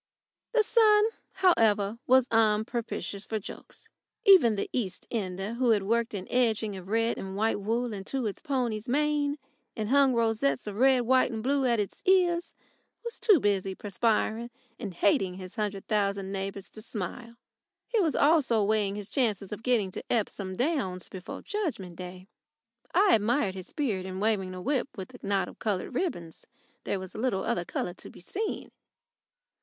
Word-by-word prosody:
The 455 -2 +4
sun, 425 -2 +5 0.3
however, 225 - +3
was 260 0 +5
unpropitious 220 -3 0
for 220 - -3
jokes. 205 - -10 0.4
Even 360 - +7
the 200 - -2
East 195 -7 -3
Ender, 195 -1 -3
who 245 +1 +1
had 210 -3 +3
worked 230 +2 0
an 190 -2 -5
edging 220 -4 +1
of 185 -1 -9
red 225 +3 +1
and 190 0 -6
white 220 +1 +1
wool 230 +3 -1
into 210 +7 -3
his 210 -3 -3
pony's 245 -6 -2
mane 295 +1 +1 0.4
and 215 -1 -2
hung 275 -1 +4
rosettes 230 +4 +1
of 205 -1 -6
red, 260 +1 +5
white, 255 +2 +3
and 220 -1 -4
blue 270 0 +2
at 235 -2 +2
its 205 - -3
ears, 355 -2 +3 0.5
was 470 - -4
too 435 -7 +5
busy 195 -3 0
perspiring 220 +3 0 0.3
and 200 -7 -6
hating 190 0 +2
his 185 0 -9
hundred 205 -3 -3
thousand 200 -2 0
neighbours 195 0 -4
to 215 - -11
smile. 230 +4 -6 0.5
He 470 -2 +1
was 330 -6 +2
also 285 -7 +4
busy 200 - 0
weighing 210 -2 +1
his 205 -1 -7
chances 215 -7 0
of 210 - -5
getting 225 -6 +1
to - - -7
Epsom 200 -4 -1
Downs 245 - -1
before 185 -1 -8
Judgment 295 - -3
Day. 180 +1 -8 0.7
I 385 +2 +5
admired 215 -1 +2
his 185 -1 -8
spirit 210 -11 -2
in 185 0 -5
waving 195 -3 0
a 180 - -7
whip 275 -2 0
with 190 -2 -7
a - - -11
knot 200 -1 0
of - - -12
coloured 205 +1 -2
ribbons. 205 - -3 0.4
There 195 - -1
was 185 -1 -8
little 220 -4 -1
other 225 -7 -1
colour 175 - -3
to - - -10
be - - -14
seen. 410 - -4
220 Hz, 170 wpm, -28 LUFS, 195-260 Hz, 0.7 s, Even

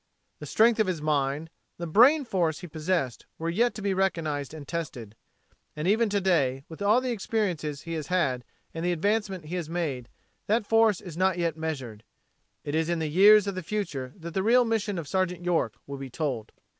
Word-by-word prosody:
The - - -7
strength 230 +1 +4
of 215 - +3
his 180 -4 -1
mind, 150 +1 -1 0.3
the 170 - -4
brain 255 - +5
force 170 -8 0
he 180 - -7
possessed 155 -5 -2
were 165 +1 -2
yet 235 +7 +1
to 210 - -6
be 200 -1 +1
recognized 160 -7 -1
and 150 -3 -9
tested. 130 -11 -5 0.6
And 150 +3 -3
even 220 +3 +3
to 200 0 +1
day, 140 -9 +1
with 160 +3 -11
all 210 +5 +4
the 255 -1 -2
experiences 185 -10 -2
he 165 - -5
has 155 -2 -4
had 140 -9 0 0.3
and 165 - -4
the 175 0 +1
advancement 195 0 -1
he 165 +4 -5
has 165 -3 -4
made, 150 -8 -3 0.4
that 215 +1 +2
force 225 -3 +3
is 170 -3 -9
not 185 0 +2
yet 170 -3 0
measured. 135 -9 -5 0.6
It 145 - -4
is 160 +1 +1
in 170 - +1
the 160 -1 -2
years 205 +5 +7
of 200 - -2
the 185 - -4
future 160 -9 -3
that 170 -2 -8
the 190 - 0
real 240 +4 +4
mission 220 -3 -1
of 165 -4 -5
Sergeant 180 +1 -1
York 165 -11 +1
will 140 0 -6
be 135 -1 -6
told. 125 -5 -3
170 Hz, 205 wpm, -27 LUFS, 150-200 Hz, 0.6 s, years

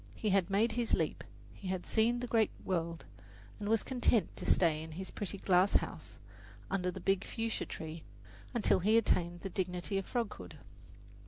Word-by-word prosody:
He 215 - -1
had 195 -2 +3
made 210 +4 +3
his 235 0 +1
leap, - - -2 0.3
he 195 - -9
had 185 -1 -2
seen 235 +2 +2
the - - -2
great 225 -3 +3 0.2
world, 170 -3 -2 0.5
and 205 - -3
was 225 -1 +3
content 245 -4 +1
to - - -6
stay 160 -4 +3
in 160 0 -8
his 190 +4 -6
pretty 200 -1 -3
glass 185 0 +3
house 110 - -1 0.5
under 185 -2 0
the 190 - -5
big 195 +2 +1
fuchsia 225 -1 -3
tree 160 +1 -6 0.5
until 235 -6 +3
he 215 +5 +4
attained 175 -5 +1
the 195 - -4
dignity 185 +1 -1
of 195 - -7
froghood. 235 -4 -3
195 Hz, 175 wpm, -33 LUFS, 175-220 Hz, 0.5 s, he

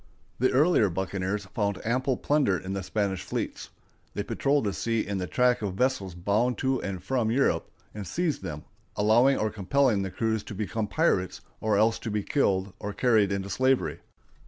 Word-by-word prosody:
The 130 +2 +3
earlier 135 - +4
buccaneers 95 +2 -2
found 100 0 -2
ample 130 +3 +1
plunder 140 -11 +2
in 95 +2 -5
the 95 - -2
Spanish 95 -1 -1
fleets. - - -4 0.5
They - - -1
patrolled 140 -1 +1
the 100 -2 -1
sea 115 +1 -1
in 100 -1 -3
the 90 - -3
track 125 +2 +2
of 100 -3 -3
vessels 100 -6 0
bound 105 +8 +1
to 130 -1 0
and 95 -2 -5
from 120 0 0
Europe, 135 +4 +1 0.2
and 105 -3 -6
seized 165 - -1
them, 75 -5 -6 0.3
allowing 120 +6 +4
or 110 0 0
compelling 110 +2 +2
the 95 - -2
crews 110 +2 -1
to 105 - -7
become 105 +2 -2
pirates, 100 - 0 0.2
or 110 -2 +1
else 110 +2 +3
to 115 - -5
be 105 -1 -1
killed 95 -8 +1
or 105 - -4
carried 110 -4 +3
into 100 0 -2
slavery. 130 0 +1
105 Hz, 180 wpm, -27 LUFS, 95-125 Hz, 0.5 s, earlier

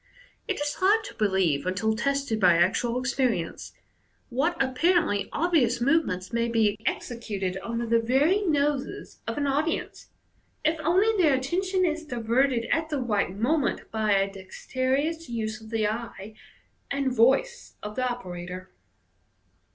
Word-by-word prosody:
It 405 - -2
is 290 0 -2
hard 415 +4 +4
to - - -8
believe, 190 -8 +1
until 200 +4 0
tested 275 -2 -1
by 180 -4 +5
actual 230 +8 +2
experience, 255 -9 -1 0.6
what 315 +8 0
apparently 270 - +2
obvious 285 -8 +2
movements 240 - +1
may 235 0 +1
be 220 -3 +2
executed 200 -6 -3
under 235 +3 -3
the 230 0 +3
very 275 - +2
noses 295 -6 -1
of - - -3
an 290 - 0
audience, 295 +4 -1 0.6
if 315 +1 +2
only 375 +8 +3
their 300 -5 +4
attention 370 +8 0
is 325 -1 -1
diverted 245 -1 +1
at 320 -1 +1
the 300 - -1
right 215 -7 0
moment 270 +6 0
by 215 -2 +1
a 195 0 +3
dexterous 260 - -2
use 220 -1 -3
of 220 - -12
the 220 -2 0
eye 215 -2 -5 0.6
and 275 -2 -1
voice 480 - +2
of 210 0 -6
the 255 +1 0
operator. 180 -5 -7
250 Hz, 140 wpm, -26 LUFS, 215-305 Hz, 0.6 s, by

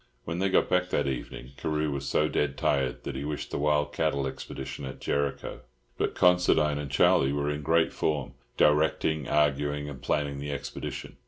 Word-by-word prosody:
When 85 +2 -4
they 95 +1 +2
got - - +3
back 90 0 +1
that 75 - +1
evening, 65 -1 -5
Carew 75 0 -1
was 70 -1 -4
so 75 +2 +2
dead 75 -3 -1
tired 65 -3 0
that 70 - -5
he 70 - -4
wished 75 0 -4
the - - -2
wild 75 0 +1
cattle 75 -4 0
expedition 65 +1 -6
at 65 -1 -7
Jericho. 70 -1 -2 0.3
But - - -1
Considine 90 -5 +4
and 75 -1 -5
Charlie 65 +1 +4
were 70 +1 0
in 75 0 -3
great 80 +3 +2
form, 75 -4 -1 0.2
directing, 75 0 +2
arguing, 75 0 +1
and 70 -3 -8
planning 70 -2 -1
the 75 +1 -4
expedition. 70 - -6
75 Hz, 180 wpm, -28 LUFS, 70-75 Hz, 0.3 s, Considine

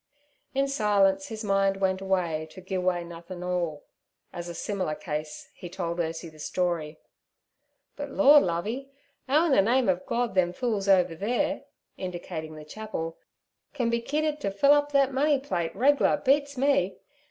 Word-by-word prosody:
In 275 +1 +2
silence 200 -7 +2
his 220 0 -6
mind 195 -1 +2
went 190 -1 0
away 175 -5 -1
to 185 - -12
'Gi' 185 +1 -8
Away 180 -1 0
Nothin"All' 170 -2 -4 0.5
and - - -6
as 175 0 -5
a 170 - -6
similar 185 -7 -2
case 150 -2 -6
he 175 - -9
told 170 -1 -4
Ursie 165 0 -3
the 155 - -17
story. 165 -2 -2 1.0
'But 285 -1 -5
Lord, 290 +1 +7
Lovey, 215 +11 -2 0.4
'ow 305 +5 +4
in 330 - +1
ther 230 - +6
name 245 +4 +2
of 185 -1 +1
Gord 240 0 0
them 180 -2 +2
fools 210 -2 -1
over 180 -3 +4
theere' 210 +8 -1 0.3
indicating 170 -4 -6
the 155 0 -10
chapel, 165 -3 -6 0.6
'can 240 -4 0
be 235 0 0
kidded 300 +3 -1
ter 200 - 0
fill 200 +9 +4
up 290 0 +2
thet 275 -1 +3
money 290 +2 +3
plate 175 -12 -3
reg'lar 275 +7 +3
beats 285 0 +1
me. 265 -9 +2
195 Hz, 165 wpm, -27 LUFS, 175-260 Hz, 1.0 s, Lord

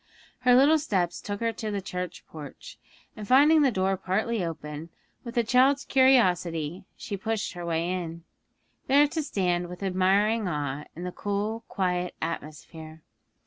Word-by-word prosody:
Her 250 -1 +5
little 290 +5 +5
steps 185 - -1
took 205 +1 -5
her 230 0 0
to 215 0 -5
the 205 -1 -2
church 180 -2 -6
porch, 150 -3 -11 0.4
and 210 -1 -8
finding 295 +5 +6
the 280 - +4
door 190 -2 0
partly 205 +3 -1
open, 160 -1 -6 0.3
with 240 0 -8
a 235 - +4
child's 265 +4 +3
curiosity, 180 - +2
she 200 - -5
pushed 220 +2 -3
her 175 -1 -7
way 165 0 -1
in, 170 -2 -4 0.6
there 285 +2 +6
to 315 +2 -2
stand 180 -10 -1
with 180 +2 -8
admiring 195 +3 +2
awe 145 -3 -3
in 175 - -7
the 180 - -4
cool, 205 +4 -3
quiet 180 -2 -2
atmosphere. 160 0 -7
190 Hz, 155 wpm, -27 LUFS, 170-230 Hz, 0.6 s, finding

